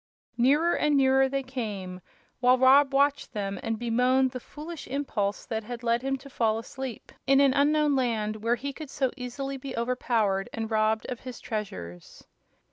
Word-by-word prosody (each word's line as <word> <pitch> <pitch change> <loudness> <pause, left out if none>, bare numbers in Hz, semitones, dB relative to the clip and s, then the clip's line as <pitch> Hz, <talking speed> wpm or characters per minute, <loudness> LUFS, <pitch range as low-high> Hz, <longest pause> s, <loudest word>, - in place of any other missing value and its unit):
Nearer 290 +8 +3
and 300 -1 +2
nearer 265 0 +4
they 275 0 -1
came, 205 -8 -5 0.4
while 250 0 +5
Rob 270 +2 +6
watched 280 +1 +1
them 195 -2 -3
and 225 0 -2
bemoaned 250 +3 +2
the 255 - -5
foolish 310 +5 -9
impulse 235 -7 -2
that 220 -1 -3
had 240 +2 -7
led 235 0 +1
him 270 +1 -1
to 270 +2 -13
fall 225 -5 0
asleep 245 +1 -7 0.2
in 270 0 +5
an 275 -2 +5
unknown 295 +1 +3
land 220 -4 0
where 230 +3 +1
he 275 +4 -5
could 305 0 -9
so 265 -2 -1
easily 270 +2 -5
be 265 -1 -7
overpowered 230 -5 0
and 225 0 -4
robbed 220 0 +1
of 245 - -5
his 255 -2 -8
treasures. 90 - -7
250 Hz, 175 wpm, -27 LUFS, 220-275 Hz, 0.4 s, Rob